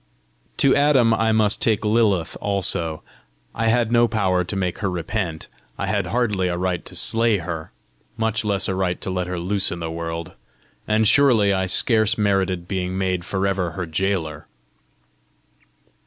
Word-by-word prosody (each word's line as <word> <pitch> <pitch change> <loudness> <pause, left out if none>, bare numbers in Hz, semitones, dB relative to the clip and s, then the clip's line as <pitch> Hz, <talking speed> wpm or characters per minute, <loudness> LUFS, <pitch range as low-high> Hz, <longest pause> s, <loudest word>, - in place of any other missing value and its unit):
To 135 - +4
Adam 135 -6 +4
I 110 0 +1
must 110 -1 +2
take 110 -1 +1
Lilith 105 -6 +1
also. 90 -5 0 0.5
I 115 0 -1
had 115 0 +2
no 120 0 +4
power 95 -5 0
to 90 - -6
make 90 -2 -2
her 100 - -1
repent! 85 -1 -4 0.3
I - - -2
had - - -1
hardly 105 -6 0
a 85 -1 -2
right 90 -1 -2
to - - -9
slay 115 -1 +2
her 85 -3 -6 0.5
much 110 0 -1
less 100 -2 0
a 95 - -1
right 95 -1 -1
to 95 - -4
let 90 -1 -2
her 90 0 -4
loose 95 +3 0
in 85 - -4
the 80 -1 -4
world! 85 0 -5 0.6
and 110 0 +2
surely 115 -8 +4
I 95 -1 0
scarce 110 +3 +3
merited 95 -4 0
being 95 -1 -3
made 95 -2 -1
for 95 +2 -2
ever 95 -4 -1
her 90 0 -4
gaoler! 80 -2 -2
95 Hz, 170 wpm, -22 LUFS, 90-110 Hz, 0.6 s, To